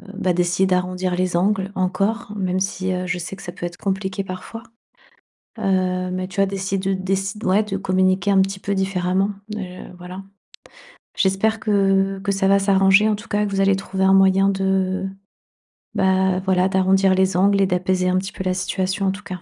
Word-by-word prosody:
bah 190 -2 0
d'essayer 175 +2 +1
d'arrondir 180 0 -1
les 180 -1 -1
angles 195 +1 0
encore, 195 +5 -1
même 185 -1 -1
si, 185 -1 -2
heu, 180 0 -3
je 180 0 -1
sais 175 +3 -6
que 195 - -13
ça 175 - -6
peut - - -6
être 175 0 -6
compliqué 195 0 -3
parfois. 190 +4 -8 1.0
Heu, 185 -1 0
mais 185 0 -3
tu 190 +1 -3
as 195 - +4
décid 195 0 -3
heu, 195 - +1
décid 195 +2 -2
ouais 190 +3 +3
de 200 -2 -3
communiquer 185 0 +1
un 195 - +4
petit 195 0 -4
peu 200 - -2
différemment, 190 0 0 0.3
heu, 185 -3 -7
voilà. 180 +2 -8 0.9
J'espère 200 +3 +1
que 195 -2 +1
que 200 - 0
ça 195 0 0
va 200 0 +5
s'arranger 195 +1 +4
en 215 - +1
tout 205 - -12
cas, 205 0 0
que - - -4
vous 195 - 0
allez 195 0 +4
trouver 190 0 -2
un 190 - +5
moyen 195 0 +4
de 190 -1 0 0.9
bah, 190 -1 +2
voilà 185 0 +1
d'arrondir 190 0 +3
les 190 0 +1
angles 200 +2 +3
et 195 - +3
d'apaiser 185 0 0
un 185 - +2
petit 190 +1 -6
peu - - -5
la 185 - +1
situation 190 +1 -2
en - - +2
tout 200 +2 -8
cas. 185 -3 -7
190 Hz, 200 wpm, -21 LUFS, 185-195 Hz, 1.0 s, va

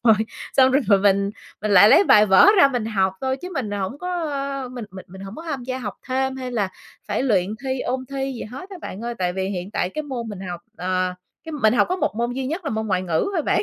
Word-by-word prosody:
rồi 225 -2 +7 0.4
xong 260 -1 +6
rồi 225 -8 +4
mình 200 0 +3 0.3
mình 210 - -1
lại 200 +1 +8
lấy 395 - +7
bài 210 -9 +6
vở 190 - +7
ra 280 - +8
mình 245 -4 -2
học 190 -4 +1
thôi 265 0 -1
chứ 360 +6 -8
mình 230 -6 -2
hổng 205 +7 -3
có 360 - -5 0.6
mình 245 -3 -6
mình 190 0 -10
mình 190 +1 -11
hổng 195 +2 -8
có 325 - -7
tham 285 -6 -4
gia 255 0 -3
học 210 -5 -5
thêm 265 +1 0
hay 255 -1 -5
là 210 -6 0 0.4
phải 205 +5 0
luyện 195 -9 +2 0.2
thi, 260 -1 -1
ôn 260 +1 -2
thi 270 0 -2
gì 240 - -6
hết 265 - -9
á 380 - -7
bạn 190 - -7
ơi. 240 0 -3
Tại 180 -1 0
vì 190 +1 -2
hiện 185 0 -4
tại 180 - -1
cái 305 - -4
môn 250 -6 -5
mình 200 -3 -7
học, 175 -2 -6 0.2
ờ, 185 0 -1 0.3
cái 320 - -7
mình 240 -7 +3
học - - +4
có 365 - 0
một 360 - -1
môn 240 +1 -1
duy 260 0 -3
nhất 330 +5 -4
là - - -2
môn 220 0 -2
ngoại 185 -2 0
ngữ 170 - 0
thôi 325 - +1
bạn. - - +1
225 Hz, 270 wpm, -22 LUFS, 195-265 Hz, 0.6 s, lại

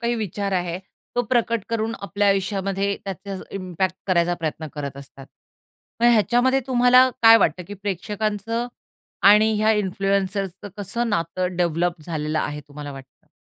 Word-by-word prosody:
काही 235 0 0
विचार 200 -2 -3
आहे, 175 -1 -1 0.4
तो 245 - +3
प्रकट 230 -2 0
करून 225 0 -1
आपल्या 200 0 0
आयुष्यामध्ये 195 0 0
त्याचा 195 +1 -6 0.2
इम्पॅक्ट 185 0 -2
करायचा 175 -1 +2
प्रयत्न 160 -1 -4
करत 140 -2 -5
असतात. 135 -1 -12 0.7
मग 235 - +5
ह्याच्यामध्ये 245 +5 +3
तुम्हाला 250 0 +5
काय 225 0 +9
वाटतं 180 -2 +1
की 205 - -6
प्रेक्षकांचं 210 +4 -3 0.6
आणि 215 +1 +5
ह्या 215 +1 +4
इन्फ्लुअन्सर्सचं 195 -1 -1
कसं 220 +4 -2
नातं 180 -1 -2
डेव्हलप 170 -1 0
झालेलं 155 -2 -2
आहे 150 0 -3
तुम्हाला 145 0 -8
वाटतं? 135 -1 -14
195 Hz, 140 wpm, -23 LUFS, 175-220 Hz, 0.7 s, काय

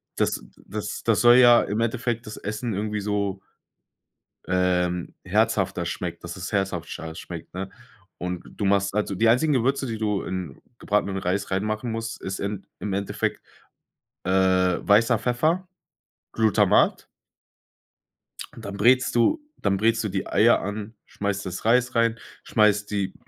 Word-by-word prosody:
Das - - 0 0.2
das - - -5
das - - +2
soll 120 +1 +7
ja 120 -1 +7
im 105 +2 -2
Endeffekt 120 0 -1
das 105 - -7
Essen 110 +2 -4
irgendwie 105 +1 -2
so 100 -1 -1 1.1
ähm, 90 -1 0
herzhafter - - +1
schmeckt - - -5
dass - - -6
es - - -6
herzhafter 85 -4 -3
schmeckt, 85 -1 -9
ne? 95 +1 -5 0.5
Und 90 0 -4
du 105 - -7
machst 100 0 +2
also 105 -1 0
die 115 +4 +2
einzigen 125 +7 +4
Gewürze, 135 +2 +1
die 115 -1 -3
du 105 -2 -1
in 90 -7 -5 0.2
gebratenem 100 -1 0
Reis 95 +2 -2
reinmachen 110 +4 -1
musst, 115 0 -5
ist 95 0 -4
in 100 -1 -4
im 100 -2 -3
Endeffekt, 100 0 -2 0.8
äh, 95 - -1
weißer 95 +4 +3
Pfeffer, 155 +10 0 0.6
Glutamat. 110 -3 +3 1.5
Dann 100 0 -8
brätst 125 +4 +4
du 295 - +3 0.2
dann 100 -1 +1
brätst 115 +2 +2
du 105 - -2
die 95 0 -3
Eier - - +4
an. 105 +2 -5
Schmeißt 100 -1 -3
das 90 +3 -6
Reis 125 +2 +3
rein, 115 0 +2 0.2
schmeißt 105 -2 +2
die 100 -2 -1
105 Hz, 145 wpm, -24 LUFS, 95-115 Hz, 1.5 s, soll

